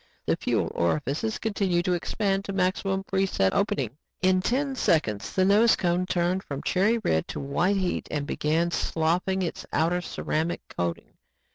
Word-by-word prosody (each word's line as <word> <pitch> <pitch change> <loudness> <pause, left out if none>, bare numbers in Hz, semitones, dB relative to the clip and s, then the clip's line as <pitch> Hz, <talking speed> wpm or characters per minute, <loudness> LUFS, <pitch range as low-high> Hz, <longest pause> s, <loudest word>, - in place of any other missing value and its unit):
The - - +2
fuel - - -1
orifices 135 - 0
continued 195 -5 0
to 180 - +2
expand 195 +2 -1
to 195 - -4
maximum 190 +1 0
pre 195 0 0
set 95 - +1
opening. 140 - -1 0.2
In 185 0 +4
ten 270 +6 0
seconds 110 - 0
the 185 - +3
nose 215 +4 +5
cone 180 +1 0
turned 180 +1 +1
from 140 -7 -6
cherry 205 +5 +2
red 80 - +1
to - - -5
white 175 +8 +1
heat 185 -2 -1
and 145 -2 -2
began 160 +4 0
sloughing 175 +4 0
its 170 - -4
outer 170 +3 +1
ceramic 165 -1 -2
coating. 85 -1 -3
180 Hz, 160 wpm, -26 LUFS, 155-195 Hz, 0.2 s, nose